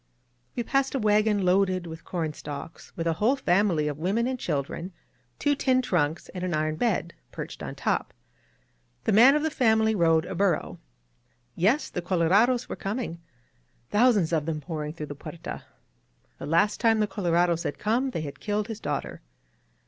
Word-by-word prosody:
We 240 - -1
passed 270 +3 0
a - - +1
wagon 210 -2 +2
loaded 185 -1 +2
with 160 0 -9
corn 160 -4 -3
stalks, 150 +2 -8
with 165 - -2
a 165 - +2
whole 220 - +2
family 180 - +2
of 145 0 -4
women 200 +8 +1
and 255 0 -2
children, 165 - -3 0.4
two 290 - +2
tin 260 -2 +2
trunks, 165 -7 0
and 180 -1 -6
an 180 -3 -1
iron 155 0 0
bed, 190 -7 0 0.2
perched - - -7
on - - -6
top. - - -1 0.9
The - - +1
man 245 +7 +7
of 300 - +1
the 315 - 0
family 220 -5 +3
rode 165 -4 +3
a - - -5
burro. 195 +1 0 0.8
Yes, 215 - +2
the 180 - -3
colorados 195 +8 +2
were - - -5
coming 195 -5 -4 0.3
— 90 - -40
thousands 210 -7 +3
of 155 -2 0
them 160 -2 -2
pouring 150 0 -5
through 155 -2 -6
the 145 - -7
Puerta. 160 +3 -8 0.7
The - - -6
last 170 +7 +2
time 225 -2 +3
the 210 - +3
colorados 175 -4 +1
had 145 - -3
come 240 +6 0
they 165 - -3
had 145 -2 -7
killed 210 +1 -2
his 225 -1 -5
daughter. - - -4
185 Hz, 180 wpm, -26 LUFS, 165-220 Hz, 0.9 s, man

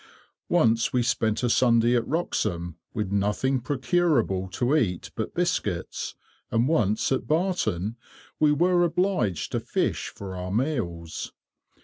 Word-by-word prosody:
Once 115 0 +3
we 125 -1 +2
spent 110 -1 0
a - - +3
Sunday 120 0 +4
at 115 -1 0
Wroxham, 85 - -1 0.2
with 105 -3 -3
nothing 105 +7 +1
procurable 130 - +1
to 125 +9 0
eat 95 - 0
but - - -4
biscuits, - - -2 0.3
and 115 +2 +2
once, 110 -10 +1
at 130 - 0
Barton, 155 - 0 0.4
we 150 -1 +5
were 175 +4 +3
obliged 170 - 0
to - - 0
fish - - -1
for 95 -2 -8
our 90 0 -5
meals. 100 - -2
120 Hz, 130 wpm, -26 LUFS, 100-150 Hz, 0.4 s, we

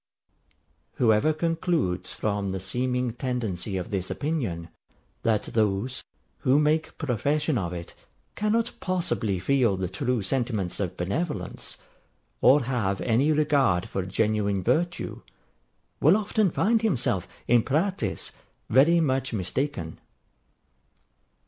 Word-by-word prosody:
Whoever 110 +5 +3
concludes 155 - 0
from 100 -2 -2
the 95 0 -3
seeming 125 +4 -1
tendency 110 -7 -2
of 95 +5 -5
this 95 -2 -2
opinion, 115 - -2 0.5
that 110 -2 +1
those, 110 +3 0 0.4
who 135 0 +3
make 150 +1 +1
profession 150 +3 0
of 90 -7 -1
it, 85 -1 -7 0.4
cannot 215 +2 +1
possibly 170 - -1
feel 115 0 +2
the 95 -1 -1
true 120 +4 -1
sentiments 110 -4 -1
of 90 -3 -3
benevolence, 100 - -3 0.6
or 135 +2 +6
have 110 -6 -1
any 125 +6 +2
regard 145 - +2
for 95 - -2
genuine 100 0 0
virtue, 175 - 0 0.8
will 165 +8 +6
often 215 -1 +1
find 220 +6 +2
himself, 125 - 0 0.2
in 120 0 +5
practice, 170 - -1 0.4
very 150 +8 +6
much 130 -5 0
mistaken. 95 - -2
125 Hz, 110 wpm, -26 LUFS, 100-150 Hz, 0.8 s, or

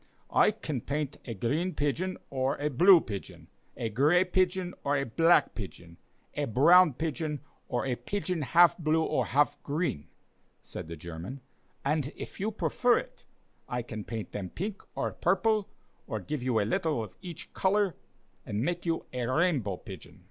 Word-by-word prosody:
"I - - +6
can 155 - -4
paint 145 +1 -3
a 115 - -5
green 155 - -1
pigeon 165 +6 -1
or 135 +1 0
a 150 +1 -1
blue 175 +6 +7
pigeon, 100 -3 -8 0.3
a 115 - -2
gray 150 - +4
pigeon 185 -1 0
or 145 +1 +2
a 140 - 0
black 165 +9 +4
pigeon, 90 -5 -9 0.4
a 145 - -1
brown 160 - +6
pigeon 155 0 -2 0.3
or 120 +2 -1
a 130 - 0
pigeon 185 +1 -3
half 170 +6 +5
blue 160 0 +2
or 130 -5 0
half 145 +3 +2
green," 145 - -2 0.6
said - - -7
the 85 - -6
German; 85 - -7 0.4
"and 145 0 0
if - - -8
you 205 +3 0
prefer 240 +3 +2
it, - - -7 0.4
I 125 -1 -2
can 110 -3 -6
paint 110 -1 -5
them 95 -3 -4
pink 200 - -5
or - - -1
purple, 210 +3 +1 0.4
or 110 - -3
give 145 +7 -4
you 125 -3 +1
a 100 - +1
little 125 +2 0
of 110 - -9
each 175 -4 -9
color, 195 -1 +2 0.5
and 105 +1 -3
make 175 +2 -2
you 165 -1 0
a 125 -2 -2
rainbow 130 - +1
pigeon." - - -11
150 Hz, 170 wpm, -29 LUFS, 120-175 Hz, 0.6 s, blue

